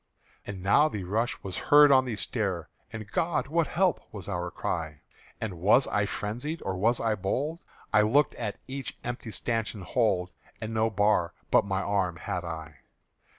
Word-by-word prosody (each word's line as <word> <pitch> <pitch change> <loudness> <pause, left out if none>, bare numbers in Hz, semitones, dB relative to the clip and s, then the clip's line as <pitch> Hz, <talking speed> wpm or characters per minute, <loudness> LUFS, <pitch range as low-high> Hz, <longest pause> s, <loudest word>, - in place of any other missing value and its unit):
And 95 -3 -6
now 145 +11 +5
the 105 -7 -4
rush 110 +7 -1
was 95 -2 -4
heard 145 0 +8
on 130 -1 +6
the 120 -3 -3
stair, 95 -3 -2 0.2
And 110 -2 -8
"God, 165 -1 0
what 165 +1 +2
help?" 180 +1 +1
was 100 -3 -8
our 90 -3 -2
cry. 80 -4 -4 0.4
And 95 -6 -4
was 105 +9 +5
I 100 -1 0
frenzied 125 +12 -3
or 95 - -2
was 115 +6 +2
I 115 -1 +1
bold? 135 - -2 0.3
I 105 - +7
looked 130 +7 +3
at 110 -4 -4
each 135 -1 -5
empty 120 -1 -5
stanchion 110 -2 -2
hold, 95 -4 +1 0.3
And 110 +1 -5
no 110 0 +2
bar 105 -4 +2 0.2
but - - +5
my 95 -1 -1
arm 95 -4 0
had 90 +2 -4
I! 80 -4 -7
105 Hz, 175 wpm, -28 LUFS, 95-120 Hz, 0.4 s, heard